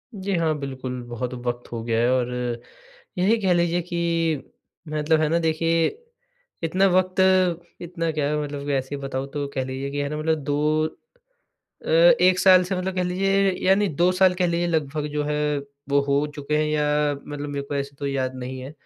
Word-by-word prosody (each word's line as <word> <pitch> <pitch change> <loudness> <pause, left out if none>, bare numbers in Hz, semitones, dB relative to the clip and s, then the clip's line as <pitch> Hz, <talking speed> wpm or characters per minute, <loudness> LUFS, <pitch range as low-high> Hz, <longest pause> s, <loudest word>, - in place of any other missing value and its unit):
जी, 195 0 -2
हाँ। 165 -2 +1
बिल्कुल, 130 -2 -5
बहुत 120 +1 -4
वक़्त 120 0 -5
हो 115 -1 -4
गया 115 -1 0
है 120 - +3
और 125 -1 +1 0.9
यही 200 +6 +3
कह 190 -2 +3
लीजिए 175 0 +1
कि, 170 -3 -1 0.5
मतलब 155 +1 +1
है 155 - +2
ना, 165 +2 +2
देखिए, 165 0 +1 0.8
इतना 185 +4 +3
वक़्त 185 0 +1 0.6
इतना 170 -1 -3
क्या 150 -2 -1
है, 150 0 0
मतलब 145 -1 -5
वैसे 140 0 -1
बताऊँ, 135 -1 -4
तो 145 -1 -2
कह 130 - 0
लीजिए 130 +1 -4
कि 145 - -3
है 140 - -2
ना, 150 - -4
मतलब 160 +1 0
2 150 +2 +1 1.0
अ, - - -8
1 485 - +5
साल 185 -1 +7
से 185 +2 -2
मतलब 185 +1 -3
कह 185 - +1
लीजिए 195 +2 +2
या 190 - +6
नहीं, 205 0 +1
2 175 +4 +3
साल 185 0 +4
कह 180 0 +1
लीजिए 170 0 0
लगभग 150 -2 -1
जो 150 0 0
है, 150 0 0 0.3
वो 140 0 +4
हो 140 +1 +1
चुके 150 +1 -1
हैं 155 - +1
या 150 -1 +1
मतलब 145 0 -6
मेरे 140 -1 -3
को 145 - -4
ऐसे 140 0 -3
तो 140 - -2
याद 130 -2 -2
नहीं 130 +1 -6
है। 130 +2 -8
150 Hz, 195 wpm, -24 LUFS, 140-175 Hz, 1.0 s, साल